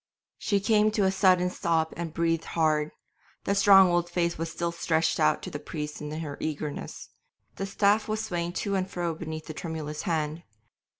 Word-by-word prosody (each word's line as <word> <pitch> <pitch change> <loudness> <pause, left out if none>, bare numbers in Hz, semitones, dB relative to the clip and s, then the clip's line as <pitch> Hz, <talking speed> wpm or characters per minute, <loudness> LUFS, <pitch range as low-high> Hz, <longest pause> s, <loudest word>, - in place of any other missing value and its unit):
She 200 -1 +1
came 210 +1 +3
to 205 - +3
a 190 - +3
sudden 185 -2 +3
stop 160 -2 0
and 170 -1 -4
breathed 165 0 0
hard; 155 -2 +2 0.5
the 200 - 0
strong 195 -1 +7
old 175 0 +1
face 170 -1 0
was 165 +1 -4
still 170 0 -2
stretched 160 -1 0
out 155 -1 +2
to - - -6
the 145 - -5
priest 150 -1 -6
in 150 - -5
her 155 -2 -5
eagerness; 150 -1 -5 0.5
the 195 - -3
staff 205 +2 +2
was 215 0 -2
swaying 175 0 -3
to 200 - -1
and 190 -1 -1
fro 175 -2 -2
beneath 160 -1 -6
the 155 - -7
tremulous 155 -2 -5
hand. 160 -3 -2
170 Hz, 185 wpm, -27 LUFS, 155-190 Hz, 0.5 s, strong